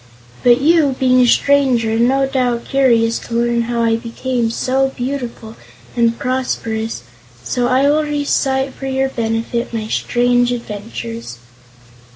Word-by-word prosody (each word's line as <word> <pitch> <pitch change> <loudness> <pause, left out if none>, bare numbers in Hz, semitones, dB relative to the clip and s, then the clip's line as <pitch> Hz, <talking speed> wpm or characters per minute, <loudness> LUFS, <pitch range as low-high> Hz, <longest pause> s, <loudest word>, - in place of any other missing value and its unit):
But 240 0 +5
you, 300 -3 +3
being 255 -1 +3
a 245 - +4
stranger, 260 -4 +3
are 225 - 0
no 265 +3 +3
doubt 250 -3 -1
curious 235 -4 +2
to 235 - -7
learn 235 0 +1
how 235 0 -1
I 225 0 +2
became 235 0 -2
so 265 +3 0
beautiful 245 -4 -5 0.4
and 235 -1 +2
prosperous, 225 - -3 0.4
so 245 - -1
I 260 +3 +3
will 300 +2 +3
recite 275 -2 0
for 270 - -7
your 265 0 0
benefit 230 0 -2
my 215 -1 -3
strange 245 +1 +1
adventures." 230 - -6
245 Hz, 140 wpm, -17 LUFS, 230-265 Hz, 0.4 s, But